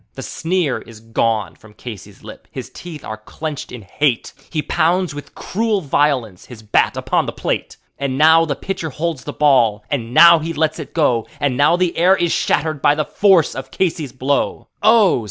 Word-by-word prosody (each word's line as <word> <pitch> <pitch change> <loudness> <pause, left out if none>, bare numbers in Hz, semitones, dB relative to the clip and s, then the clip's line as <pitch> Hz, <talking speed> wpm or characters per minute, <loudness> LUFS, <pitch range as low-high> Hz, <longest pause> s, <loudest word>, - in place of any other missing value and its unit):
The - - -7
sneer 165 -5 -1
is 115 -2 -13
gone 115 -2 -1
from 110 -1 -18
Casey's 105 -4 -10
lip; - - -12
his - - -8
teeth 165 -5 -10
are 110 - -5
clenched 145 +6 -7
in 125 -4 -9
hate; 125 +6 -1 0.2
He 155 -2 -2
pounds 175 +1 +1
with 145 0 -10
cruel 220 +1 -1
violence 135 - 0
his 115 -3 -12
bat 105 - +1
upon - - 0
the - - -2
plate. - - -3 0.2
And 135 -1 -2
now 160 +2 +6
the 145 -3 -2
pitcher 185 +1 -4
holds 155 -2 -4
the - - -4
ball, 120 -8 +3
and 120 -5 -2
now 170 +4 +8
he 165 +2 -4
lets 160 +1 -1
it 155 - -9
go, 125 -8 +1
And 140 -3 0
now 145 +5 +4
the 180 -1 0
air 180 +3 +4
is 170 -1 0
shattered 155 -3 0
by 145 - +4
the 155 0 -1
force 190 -4 +3
of 130 0 -7
Casey's 160 -7 -2
blow. 135 +3 -2
Oh! 215 - +5
145 Hz, 190 wpm, -19 LUFS, 125-165 Hz, 0.2 s, now